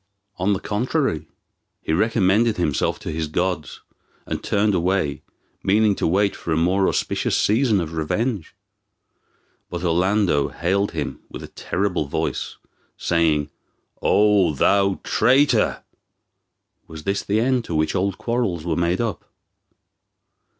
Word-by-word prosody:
On 95 +3 +2
the 95 - -1
contrary, 115 - -1 0.5
he 80 - -3
recommended 110 +3 +2
himself 80 -5 0
to - - -5
his 80 0 -2
gods, 90 0 -2 0.4
and - - -4
turned 105 +1 +1
away, 90 -5 0 0.4
meaning 105 +2 +3
to - - -1
wait 100 +4 +2
for 85 - -6
a 80 - +2
more 95 +4 +2
auspicious - - 0
season 110 -1 +2
of 80 -2 -4
revenge. 95 +4 -2 1.1
But 90 0 -5
Orlando 90 -2 +2
hailed 100 +4 -1
him 75 -3 -4
with - - -8
a - - -9
terrible 90 -4 -2
voice, - - -3 0.4
saying, 80 -4 +1 0.5
"O 100 -6 +3
thou 100 +6 +2
traitor! 135 +4 +2 1.0
was 80 -1 -10
this 100 +3 -1
the 105 +2 0
end 125 +1 +1
to 85 - -4
which 80 0 +1
old 95 0 -1
quarrels 115 -9 -2
were 85 -2 0
made 85 +3 0
up?" 115 -5 -3
95 Hz, 130 wpm, -22 LUFS, 80-105 Hz, 1.1 s, meaning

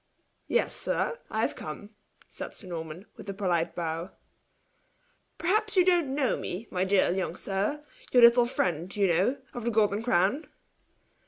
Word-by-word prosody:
"Yes, - - +1
sir 470 - -1
I 220 - -1
have - - 0
come!" 180 +7 -8 0.4
said - - -8
Sir - - -11
Norman, 165 +1 -6
with - - -9
a 195 - -4
polite 175 -4 0
bow. 165 +1 -3 1.3
"Perhaps 420 +5 0
you 365 - +6
don't 340 -7 +2
know 280 -3 +1
me, 200 +6 -5
my 180 0 0
dear 190 -2 +3
young 185 -2 -2
sir 205 +11 -2 0.3
your 245 -1 +6
little 235 0 +7
friend, 180 -6 -1
you 205 -1 +3
know, 190 +10 +2 0.2
of 245 - -5
the 235 - 0
Golden 210 -2 +2
Crown." 225 - +1
205 Hz, 160 wpm, -28 LUFS, 180-250 Hz, 1.3 s, little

